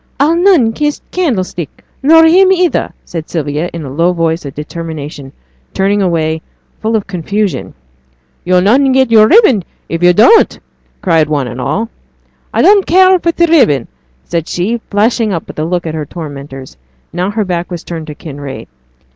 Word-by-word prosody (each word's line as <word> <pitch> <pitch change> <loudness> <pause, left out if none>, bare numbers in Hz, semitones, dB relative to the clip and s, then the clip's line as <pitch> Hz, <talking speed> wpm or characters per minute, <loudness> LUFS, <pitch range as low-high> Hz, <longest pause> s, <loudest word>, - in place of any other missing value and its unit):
'I'll 300 +4 +3
none 340 - +3
kiss 295 +3 -1
t' - - -31
candlestick, 195 - -3 0.2
nor 325 +4 +6
him 370 +4 +5
either,' 360 -2 +1
said 165 -2 -7
Sylvia, 150 +1 -2
in 165 -3 -7
a 135 - -7
low 170 +4 +1
voice 165 -1 -1
of 140 - -8
determination, 150 -3 -7 0.4
turning 200 +1 +1
away, 160 -3 0 0.4
full 220 +1 0
of 215 - -1
confusion. 190 - -3 0.7
'Yo'll 180 0 +2
not 235 +8 +4
get 260 -2 +2
yo'r 215 -1 +6
ribbon 305 - +4 0.3
if 165 +1 -3
yo' 175 0 +6
dunnot,' 230 - +4 0.5
cried 165 -5 +2
one 145 -4 -1
and 120 +2 -6
all. 155 - -2 0.6
'I - - +1
don't 400 -1 +4
care 370 +1 +5
for 335 - 0
t' 340 +1 +2
ribbon,' 250 - +3 0.4
said 165 -2 -3
she, 220 +7 -2
flashing 220 +1 +1
up 170 -4 -4
with - - -9
a 155 - -1
look 175 +1 -2
at 160 - -4
her 155 -2 -4
tormentors, 140 -5 -9 0.4
now 180 +3 -1
her 210 0 -2
back 175 -2 -3
was 175 -2 -6
turned 165 -2 -7
to 150 - -8
Kinraid. 145 -3 -8
180 Hz, 175 wpm, -13 LUFS, 155-240 Hz, 0.7 s, nor